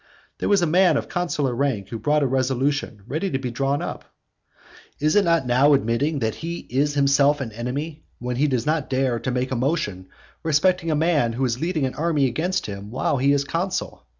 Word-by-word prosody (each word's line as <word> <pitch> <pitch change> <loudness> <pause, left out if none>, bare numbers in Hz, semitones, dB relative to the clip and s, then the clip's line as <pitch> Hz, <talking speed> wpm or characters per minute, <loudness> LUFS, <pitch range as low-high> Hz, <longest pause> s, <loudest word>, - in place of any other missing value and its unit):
There - - -1
was 200 -3 +4
a - - +4
man 180 +3 +4
of - - -3
consular 150 -7 -1
rank 120 -7 -1
who 115 - -4
had - - -13
brought 150 0 +2
a - - +2
resolution 130 -3 -1
ready 155 - -2
drawn 135 +1 -1
up. - - -6 0.9
Is 155 +4 +2
it 205 - +5
not 165 -5 +2
now 135 +4 +4
admitting 135 +5 0
that 110 -4 -1
he 170 +1 -4
is 145 +3 +1
himself 140 +1 +3
an 130 -5 -4
enemy, 140 +8 -4 0.2
when 125 0 -4
he 150 +3 +3
does 125 -4 -1
not 155 -2 0
dare 130 -2 0
to 130 - -3
make 125 +1 -1
a - - 0
motion 120 - -1 0.3
respecting 165 +2 +2
a 155 - +2
man 150 -7 +2
who 130 +3 0
is 120 0 -2
leading 165 -4 0
an 130 - -3
army 155 -3 +1
against 160 +9 -1
him 100 0 -7
while 130 +4 0
he 135 +2 +3
is 140 -1 +2
consul? 175 +6 -3
140 Hz, 205 wpm, -23 LUFS, 125-155 Hz, 0.9 s, it